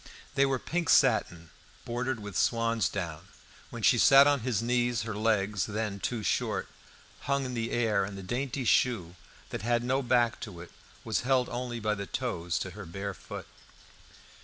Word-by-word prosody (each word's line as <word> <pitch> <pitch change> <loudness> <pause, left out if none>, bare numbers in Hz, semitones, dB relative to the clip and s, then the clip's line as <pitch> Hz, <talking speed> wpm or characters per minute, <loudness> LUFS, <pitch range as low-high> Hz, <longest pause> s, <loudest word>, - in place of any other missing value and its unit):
They 140 0 +3
were 135 -1 +1
pink 170 +6 -2
satin, 85 -2 +3 0.3
bordered 120 +1 -2
with 105 -3 -8
swansdown. 100 -8 0 0.4
When - - -8
she - - +5
sat 135 +1 +8
on 145 -1 +3
his 120 -3 -1
knees, 120 -1 +1
her 115 -1 -4
leg, 105 -1 +1
then 105 0 -2
too 115 +1 -3
short, - - -1 0.6
hung 140 -1 +1
in 125 - -4
the 115 -1 -2
air, 110 -4 +1
and 100 0 -5
the 95 - -7
dainty 130 +5 -3
shoe, 105 -9 +2 0.4
that - - -4
had 120 +2 +1
no 130 +2 +1
back 120 -2 +2
to 95 -6 -8
it, 85 - -10 0.3
was 110 -3 0
held 125 0 +2
only 120 -1 -4
by 105 -1 0
the 100 -2 -5
toes 85 +1 -2
to - - -4
her - - -9
bare 100 +3 -5
foot. - - -9
115 Hz, 175 wpm, -29 LUFS, 100-125 Hz, 0.6 s, sat